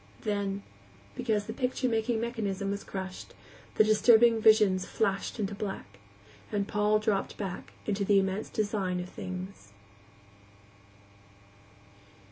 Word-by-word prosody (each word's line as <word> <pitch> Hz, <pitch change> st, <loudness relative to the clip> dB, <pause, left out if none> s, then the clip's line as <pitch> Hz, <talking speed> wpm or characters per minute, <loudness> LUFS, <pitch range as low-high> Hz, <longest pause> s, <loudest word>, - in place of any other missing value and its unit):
Then, 200 Hz, -1 st, -2 dB, 0.5 s
because 215 Hz, -, -1 dB
the 220 Hz, -, -5 dB
picture 255 Hz, +1 st, -1 dB
making 225 Hz, 0 st, 0 dB
mechanism 205 Hz, -4 st, -2 dB
was 200 Hz, 0 st, -4 dB
crushed, 190 Hz, -1 st, -7 dB, 0.4 s
the -, -, +6 dB
disturbing 225 Hz, +1 st, +5 dB
visions 210 Hz, -4 st, +5 dB
flashed 195 Hz, +2 st, -1 dB
into 205 Hz, -1 st, -1 dB
black, 200 Hz, -, -6 dB, 0.5 s
and 205 Hz, -2 st, -1 dB
Paul 210 Hz, 0 st, +2 dB
dropped 215 Hz, -2 st, -1 dB
back 190 Hz, -3 st, -6 dB
into 205 Hz, -1 st, -1 dB
the 200 Hz, 0 st, +4 dB
immense 195 Hz, +2 st, 0 dB
design 205 Hz, -4 st, -1 dB
of 180 Hz, 0 st, -5 dB
things. 185 Hz, -, -8 dB
205 Hz, 115 wpm, -29 LUFS, 195-220 Hz, 0.5 s, the